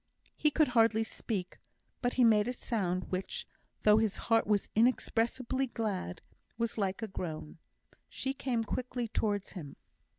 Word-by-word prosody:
He 305 - +3
could 300 -1 +3
hardly 225 -2 +4
speak, 200 -4 -4 0.4
but 245 -1 +1
he 255 - +4
made 215 -2 +5
a 250 - -1
sound 185 -8 -2
which, 195 - -3 0.4
though 210 0 +7
his 220 -3 +1
heart 225 -2 +2
was 205 -2 +2
inexpressibly 255 +2 +1
glad, 205 -7 -3 0.4
was 230 -1 -1
like 195 0 -1
a - - -1
groan. 160 -5 -6 0.5
She 265 0 -2
came 255 -4 -1
quickly 245 +1 -3
towards 205 -2 -1
him. 155 -8 -8
225 Hz, 145 wpm, -32 LUFS, 195-245 Hz, 0.5 s, though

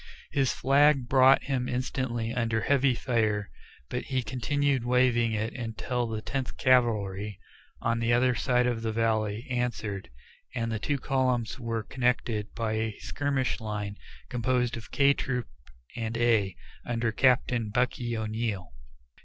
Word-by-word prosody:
His 135 -3 +2
flag 140 0 +3
brought 130 +1 +6
him 130 -3 -1
instantly 125 -2 -2
under 115 -2 0
a - - -4
heavy 140 -2 +3
fire, 110 -5 0 0.4
but - - -4
he 130 -2 -1
continued 135 +2 0
waving 120 -2 +3
it 110 +2 -2
until 120 +1 -3
the 110 -1 -4
Tenth 135 -2 -3
Cavalry 105 -6 +2 0.4
on 115 0 0
the 115 0 +1
other 125 +1 +4
side 125 0 +2
of 120 -2 0
the 110 -1 -1
valley 110 0 0
answered, 120 -6 -2 0.5
and 115 -2 -1
the 110 - -2
two 145 +6 -1
columns 130 -3 0
were 115 -2 -2
connected 120 -4 -1
by 115 -2 -1
a 110 -1 -2
skirmish 140 -3 -1
line 105 -2 -4 0.3
composed 125 0 0
of 115 -1 -9
K 140 0 +4
Troop 125 -4 -2 0.5
and 115 -1 -3
A, 110 -6 +2 0.3
under 115 -1 -1
Captain 125 -2 +2
"Bucky" 120 0 0
O'Neill. 110 - -3
120 Hz, 145 wpm, -28 LUFS, 110-130 Hz, 0.5 s, brought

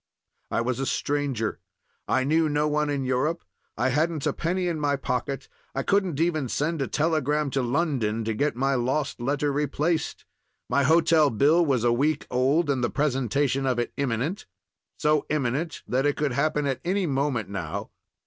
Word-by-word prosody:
I - - 0
was 125 +2 -1
a 135 - -1
stranger; 140 -6 -1 0.5
I 130 - +2
knew 155 +3 +2
no 150 +1 +1
one 150 0 0
in 140 -2 -1
Europe; 150 +7 0 0.3
I 125 +4 +2
hadn't 155 +2 0
a - - +1
penny 180 +2 -1
in 165 -3 -1
my 145 -1 +1
pocket; 135 0 -3 0.3
I 135 - -1
couldn't 190 -7 +1
even 155 -6 +1
send 155 +4 -1
a 135 - 0
telegram 150 -1 0
to 135 - 0
London 120 -5 0
to 110 0 -1
get 145 +6 0
my 135 +2 +1
lost 130 +1 -1
letter 145 +3 0
replaced; 150 +3 -1 0.4
my 140 +3 +2
hotel 160 +1 +4
bill 145 +9 +4
was 135 -7 +1
a 120 -1 +3
week 145 +4 +1
old, 135 +6 +2
and 135 -3 0
the 120 - +2
presentation 135 0 0
of 125 -2 +1
it 120 - -2
imminent—so 130 - -2
imminent 150 +3 -1
that 130 +3 +1
it 145 - 0
could 150 -2 0
happen 150 +3 0
at 135 -2 -1
any 190 +2 0
moment 135 - 0
now. 100 +1 -5
140 Hz, 175 wpm, -26 LUFS, 125-155 Hz, 0.5 s, hotel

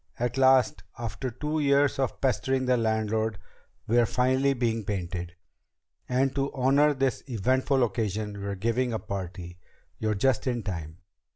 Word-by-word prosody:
At 120 0 -1
last, 130 -1 +4 0.2
after 120 +2 -4
two 150 +6 -3
years 140 -1 +3
of 135 -2 -1
pestering 130 0 +1
the 125 0 +3
landlord, 110 -1 0 0.5
we're 120 +1 +3
finally 130 +3 +2
being 115 -3 0
painted! 90 -3 -4 0.7
And 130 +1 +1
to 140 0 -1
honor 140 +3 +3
this 135 -1 0
eventful 130 +3 +1
occasion, 105 -2 -2
we're 100 0 -3
giving 115 +5 0
a - - 0
party. 90 -3 -6 0.4
You're 110 -1 0
just 130 +5 +1
in 120 -3 -1
time." 80 -5 -5
120 Hz, 145 wpm, -27 LUFS, 105-130 Hz, 0.7 s, last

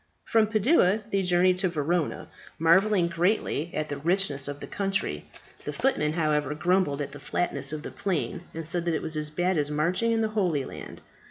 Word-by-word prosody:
From 220 -1 +3
Padua 215 - +3
they 195 - +2
journeyed 180 0 +3
to 185 0 +1
Verona, 165 0 -1 0.3
marvelling 180 +3 +4
greatly 170 -1 0
at 155 0 -2
the 145 - -3
richness 160 -4 0
of 145 0 -5
the - - -6
country. 195 0 -2 0.4
The - - -4
footmen, 155 - +1
however, 150 -3 0
grumbled 175 -3 +1
at - - -7
the 145 - -10
flatness 145 -1 -1
of 155 0 -5
the - - -6
plain, 185 -1 -2
and 165 -1 -6
said 170 0 -1
that 170 -2 +1
it - - -3
was 160 - -1
as 150 0 -1
bad 175 +2 0
as 145 0 0
marching 175 +10 +1
in 225 0 +1
the 220 - +1
Holy 180 -10 0
Land. - - -9
170 Hz, 195 wpm, -27 LUFS, 150-195 Hz, 0.4 s, marvelling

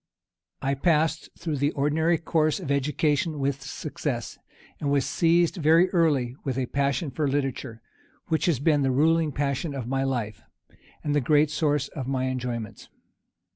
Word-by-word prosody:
I 135 +1 +1
passed 160 +2 +1
through 155 -4 -3
the 145 +2 +2
ordinary 160 +4 +1
course 155 0 +1
of 160 -7 -4
education 150 +2 0
with 140 0 -1
success, 140 -3 -5 0.4
and 145 - -1
was 140 -1 +2
seized 170 +1 +2
very 165 +3 +4
early 145 -9 +2
with 135 -2 -2
a 130 - 0
passion 140 +2 -1
for 150 0 -1
literature, 135 -4 -3 0.4
which 160 0 0
has 165 -6 +3
been 145 +2 +2
the 135 - +2
ruling 155 +4 +2
passion 140 +1 -2
of 130 -4 -4
my 135 +1 0
life, 120 -5 -2 0.6
and 145 - -1
the 145 - +2
great 150 +3 +3
source 150 -1 +1
of 135 -4 -6
my 130 -1 -1
enjoyments. 120 -4 -5
145 Hz, 160 wpm, -26 LUFS, 135-155 Hz, 0.6 s, very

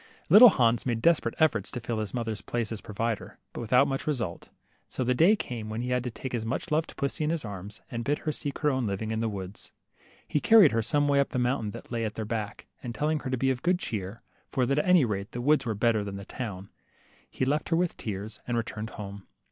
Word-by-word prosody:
Little 215 +8 +11
Hans 120 - +2
made 120 -3 -1
desperate 170 +7 +2
efforts 115 - +2
to 125 - -5
fill 115 -1 -3
his 105 -2 -3
mother' 115 -3 -2
s^ 105 - -9
place 115 -2 -2
as 110 - -4
provider, 110 0 -3 0.2
but - - -5
without 125 +4 +4
much 135 +1 -3
result. 115 - -3 0.4
So 130 - -2
the 125 +1 +2
day 170 - +5
came 115 - -5
when 110 +2 -3
he 125 - -3
had 125 -1 +1
to - - -1
take 130 +2 -7
his 120 -3 -2
much 130 +9 -3
loved 155 +1 0
pussy 140 +2 -1
in 150 - +1
his 160 -5 -1
arms, 100 +1 -7
and 115 0 -3
bid 145 +5 +1
her 155 - +1
seek 145 -2 -4
her 150 -1 +2
own 130 -4 0
living 105 +3 -3
in 110 - -1
the 115 0 0
woods. 95 -1 -7 0.5
He 150 - +1
carried 215 -3 +7
her 115 - +1
some 145 +5 +1
way 140 -1 +3
up 140 - +2
the - - -3
mountain 125 -3 0
that 105 - -10
lay 115 -1 -1
at 110 -1 -3
their 110 - -3
back, 105 -2 -4 0.2
and 120 -2 -6
telling 150 +1 0
her 135 - -5
to 130 - 0
be 135 +2 +2
of 125 -1 -3
good 180 +1 +2
cheer, 105 - -5 0.3
for 130 - +1
that 140 +3 +1
at - - 0
any 180 -6 +6
rate 100 -2 -4
the 120 - -4
woods 140 0 +3
were 110 - -1
better 110 0 +2
than 100 -1 -5
the 100 - -8
town, 100 -6 -6 0.6
he 130 - -2
left 150 +3 0
her 165 - +3
with 175 0 +1
tears, 105 0 -6
and 120 -1 0
returned 110 -1 -4
home. 100 -2 -8
120 Hz, 260 wpm, -28 LUFS, 110-140 Hz, 0.6 s, Little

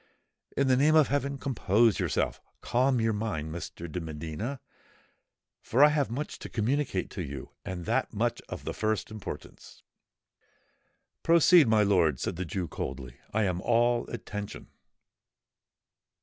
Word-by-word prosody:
"In 140 - +3
the 130 - +5
name 150 +4 +4
of 155 -3 +5
heaven! 140 0 -1
compose 115 -5 +2
yourself—calm 130 +1 0
your 115 -1 +1
mind, 90 -8 -3
Mr. 85 0 -6
de 90 - -3
Medina—for 80 - -4
I 150 - +8
have 150 -4 +1
much 140 +6 -4
to - - -8
communicate 120 -3 -1
to - - -5
you—and 85 +4 -7
that - - 0
much - - -1
of - - -7
the - - -3
first 110 0 -1
importance." 110 -3 -9 1.4
"Proceed, 170 -2 +6
my 110 -1 +4
lord," 85 -9 +3
said - - -2
the 90 +2 -3
Jew 90 +1 -3
coldly: 65 -4 -6
"I 110 +1 +1
am 90 -2 -1
all 120 +1 +2
attention." 105 -3 -6
110 Hz, 135 wpm, -29 LUFS, 90-130 Hz, 1.4 s, I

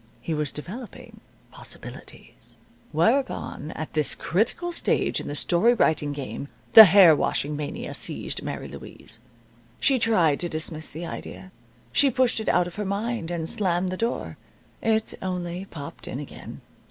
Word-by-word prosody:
He 165 - -4
was 150 -2 -1
developing 205 - -9 0.3
possibilities. - - -11 0.3
Whereupon, 225 - 0
at 155 - -6
this 150 -1 +1
critical 225 - -1
stage 335 - +1
in - - -7
the 145 - -4
story 185 +10 +3
writing 150 -8 +1
game, 140 0 -6 0.3
the 220 - +13
hair 185 -5 +7
washing 150 0 -1
mania 145 0 -5
seized - - -1
Mary - - -5
Louise. 110 +1 -10 0.6
She 270 -2 +3
tried 180 -11 +3
to 175 - -3
dismiss 155 0 0
the 165 +3 -7
idea. 190 +2 -8 0.4
She 280 - +4
pushed 255 -2 +1
it 220 - -2
out 180 - +3
of 175 +2 -9
her 210 - -2
mind, 200 -2 -2
and 170 -2 -2
slammed 180 -2 +1
the 185 - -3
door. 230 +5 -3 0.4
It 220 -1 0
only 180 0 -4
popped 145 -7 -9
in 130 - -5
again. 145 - -9
175 Hz, 155 wpm, -25 LUFS, 155-220 Hz, 0.6 s, the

